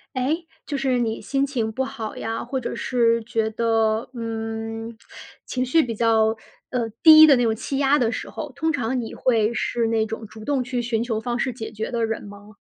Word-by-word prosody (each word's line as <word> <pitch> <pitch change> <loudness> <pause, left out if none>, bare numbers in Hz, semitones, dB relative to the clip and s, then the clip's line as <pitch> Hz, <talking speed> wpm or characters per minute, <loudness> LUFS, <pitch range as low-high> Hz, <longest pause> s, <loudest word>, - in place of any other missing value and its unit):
诶， 310 +7 -1 0.2
就 285 - -2
是 260 -2 +1
你 225 -2 -1
心 275 0 0
情 240 -6 -2
不 265 +4 -1
好 230 -5 -6
呀， 225 0 -3
或 265 +2 -3
者 240 - -4
是 230 -2 +1
觉 225 -1 -1
得， 225 0 +1
嗯， 225 0 -5 0.5
情 255 0 -2
绪 320 +6 +4
比 235 -4 -3
较， 220 0 +3 0.4
呃， 240 -3 -1
低 315 -1 +10
的 285 -3 +6
那 245 - +2
种 225 -1 +2
气 270 +5 -4
压 280 +1 +4
的 235 -4 +2
时 - - -5
候， - - -6
通 320 0 0
常 255 -3 -1
你 225 - -6
会 230 -3 +2
是 235 +1 -1
那 225 -1 +1
种 225 0 -6
主 215 +1 -12
动 275 -3 0
去 245 0 -2
寻 235 -1 -1
求 225 -3 -2
方 240 +1 -2
式 255 +1 -1
解 225 -2 -7
决 220 0 -5
的 235 -2 0
人 225 0 -4
吗？ 205 0 -12
230 Hz, 230 characters per minute, -23 LUFS, 225-255 Hz, 0.5 s, 低